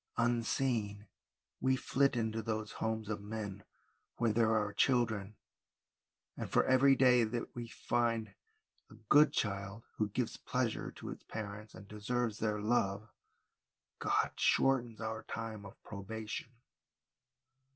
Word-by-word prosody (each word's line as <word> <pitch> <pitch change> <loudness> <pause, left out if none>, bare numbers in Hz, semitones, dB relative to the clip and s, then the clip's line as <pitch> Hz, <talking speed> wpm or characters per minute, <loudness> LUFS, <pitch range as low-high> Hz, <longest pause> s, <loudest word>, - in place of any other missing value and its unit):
" - - -34
Unseen 115 -3 0 0.5
we 130 0 +3
flit 140 +1 +2
into 110 -1 -1
those 110 -1 -3
homes 110 -1 -2
of 105 -1 -3
men 100 -2 -5 0.5
where 115 -2 +2
there 110 0 +3
are 105 -1 0
children, 110 -4 +1 1.0
and - - -5
for - - +4
every 135 +1 +6
day 125 -2 +5
that 115 +2 -3
we 120 -1 -5
find 115 -1 -1 0.6
a - - -14
good 150 +1 +7
child 100 +1 -2
who 105 -1 +1
gives 115 +3 -2
pleasure - - -1
to - - -9
its - - -9
parents 105 -1 -6
and 100 - -11
deserves 110 +2 -2
their 105 -1 0
love, 105 -1 0 0.9
God - - +1
shortens 120 -4 +2
our 110 0 -3
time 110 -2 -6
of - - -14
probation. 110 +2 -6
110 Hz, 130 wpm, -34 LUFS, 105-120 Hz, 1.0 s, good